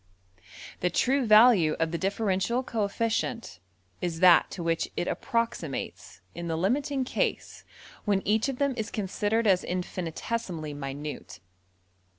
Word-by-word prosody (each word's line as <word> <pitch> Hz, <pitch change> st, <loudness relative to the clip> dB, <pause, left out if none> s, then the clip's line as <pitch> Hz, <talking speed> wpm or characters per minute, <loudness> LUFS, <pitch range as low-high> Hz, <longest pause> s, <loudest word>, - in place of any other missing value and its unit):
The 180 Hz, -, +1 dB
true 260 Hz, +8 st, +1 dB
value 215 Hz, -7 st, +6 dB
of 165 Hz, 0 st, -1 dB
the 170 Hz, -, -1 dB
differential 200 Hz, +4 st, 0 dB
coefficient 225 Hz, -, -2 dB, 0.4 s
is 170 Hz, -2 st, -2 dB
that 180 Hz, -1 st, +6 dB
to 175 Hz, -, -6 dB
which 165 Hz, 0 st, 0 dB
it 175 Hz, -, -1 dB
approximates 230 Hz, -, -3 dB
in 170 Hz, 0 st, -6 dB
the 165 Hz, -1 st, -1 dB
limiting 265 Hz, -, 0 dB
case 255 Hz, -, -2 dB, 0.4 s
when 200 Hz, -2 st, 0 dB
each 220 Hz, +5 st, +2 dB
of 265 Hz, -, -4 dB
them 280 Hz, 0 st, +1 dB
is 215 Hz, -2 st, -3 dB
considered 210 Hz, +2 st, -1 dB
as 190 Hz, -3 st, +3 dB
infinitesimally 180 Hz, -1 st, -4 dB
minute. 145 Hz, +1 st, -6 dB
195 Hz, 130 wpm, -27 LUFS, 170-230 Hz, 0.4 s, value